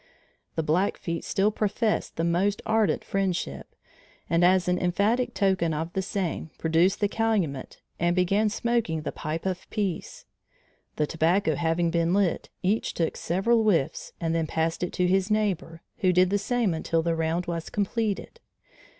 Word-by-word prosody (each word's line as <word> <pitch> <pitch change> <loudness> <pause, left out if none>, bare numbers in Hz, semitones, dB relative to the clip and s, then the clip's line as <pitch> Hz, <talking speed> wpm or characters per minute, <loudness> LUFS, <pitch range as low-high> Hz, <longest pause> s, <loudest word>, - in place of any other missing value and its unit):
The 160 - 0
Blackfeet 170 +1 0
still 200 +2 +1
professed 215 +1 -1
the 165 - -1
most 185 +5 +1
ardent 220 -1 +2
friendship, 180 - -2 0.5
and 170 +1 +2
as 180 0 +4
an 180 0 +2
emphatic 215 +7 +1
token 185 -5 +1
of 160 +3 -4
the 190 - 0
same, 185 -4 -3
produced 165 +5 +2
the 205 - +4
calumet 200 - -1 0.2
and 175 +1 +2
began 195 +4 +2
smoking 215 -8 -1
the - - -3
pipe 160 +2 -4
of 185 -1 -3
peace. 200 -6 -3 0.7
The 150 - +1
tobacco 170 +6 +1
having 170 0 +1
been 170 +1 +1
lit, 200 -4 +1
each 205 +5 0
took 165 -2 0
several 225 +7 +1
whiffs 170 -8 0
and 165 -1 -1
then 165 -1 0
passed 160 +1 -1
it 180 - -1
to 180 - +1
his 190 +2 +2
neighbor, 195 -6 -1 0.2
who 185 - +3
did 180 +1 +4
the 205 - +2
same 235 -3 0
until 165 0 0
the 165 0 0
round 165 +2 -1
was 170 -1 -4
completed. 210 - -2
180 Hz, 160 wpm, -26 LUFS, 165-205 Hz, 0.7 s, as